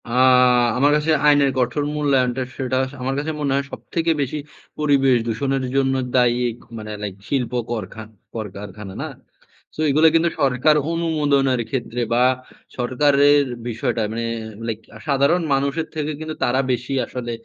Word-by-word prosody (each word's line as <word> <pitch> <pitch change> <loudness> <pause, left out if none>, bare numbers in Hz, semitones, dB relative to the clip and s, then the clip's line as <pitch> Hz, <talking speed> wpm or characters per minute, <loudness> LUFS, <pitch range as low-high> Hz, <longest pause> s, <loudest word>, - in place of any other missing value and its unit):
আ - - -9 0.7
আমার 145 +3 +4
কাছে 150 +1 +1 0.2
আইনের 145 -2 +5
কঠোর 125 +3 0
মূল্যায়নটা, 135 -4 +1 0.2
সেটা 130 -1 -1
স - - -16
আমার 135 +2 -1
কাছে 155 +2 -2
মনে 140 -2 0
হয় 140 0 0
সবথেকে 165 -1 -2
বেশি 140 +2 -2 0.4
পরিবেশ 140 -4 +3
দূষণের 135 +4 -1
জন্য 135 -1 +2 0.2
দায়ী। 120 -1 +3 0.4
মানে 110 -1 -7
লাইক 100 -2 -4
শিল্প 130 -4 0 0.2
করখা 110 -1 -5 0.3
কলকারখানা, 105 -2 -7
না? - - -3 0.7
সো - - -14
এগুলো 155 +3 +5
কিন্তু 165 +1 +3
সরকার 135 +3 +3 0.2
অনুমোদনের 145 -6 +1
ক্ষেত্রে 120 -1 -3
বা, 120 +1 +4 0.5
সরকারের 145 +3 +3 0.2
বিষয়টা 120 0 -2
মানে 115 +1 -3 0.4
লাইক 110 -2 -3 0.3
সাধারণ 140 +5 +3
মানুষের 140 +4 0
থেকে 155 -1 -2
কিন্তু 155 0 -5
তারা 130 +2 +2
বেশি 125 +2 -2
আসলে 120 -2 -5
135 Hz, 145 wpm, -21 LUFS, 120-145 Hz, 0.7 s, আইনের